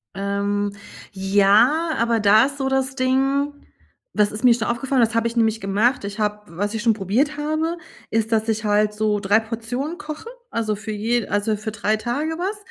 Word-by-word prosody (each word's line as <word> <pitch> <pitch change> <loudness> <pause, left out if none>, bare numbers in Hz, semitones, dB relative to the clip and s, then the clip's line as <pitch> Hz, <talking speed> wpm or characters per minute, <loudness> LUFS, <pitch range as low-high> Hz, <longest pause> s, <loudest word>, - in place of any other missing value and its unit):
Ähm, 200 +1 -1 0.4
ja, 205 - +3
aber 230 0 +1
da 210 +2 +5
ist 275 0 -5
so 270 -1 -1
das 265 0 0
Ding, 270 +2 +1 0.6
das 210 -1 +2
ist 215 - -6
mir 245 -2 +7
schon 230 -2 -2
aufgefallen, 255 +2 0
das 230 0 +2
habe 230 0 +2
ich 235 +1 -5
nämlich 225 -1 +2
gemacht. 205 +5 +1
Ich 200 +2 -6
habe 210 0 -1 0.2
was 205 +3 -1
ich 220 - -3
schon 230 -2 +4
probiert 230 +10 0
habe, 310 +3 -1 0.3
ist, 225 0 0
dass 220 +1 +1
ich 220 0 -1
halt 210 0 +2
so 210 -1 0
3 205 +2 +3
Portionen 230 +8 -4
koche, 345 +3 -7 0.2
also 215 -2 -1
für 215 +2 -7
je 225 +2 -1
also 205 +1 0
für 215 +1 -5
3 210 +1 0
Tage 245 +8 -2
was. 390 +4 -2
225 Hz, 195 wpm, -22 LUFS, 210-265 Hz, 0.6 s, mir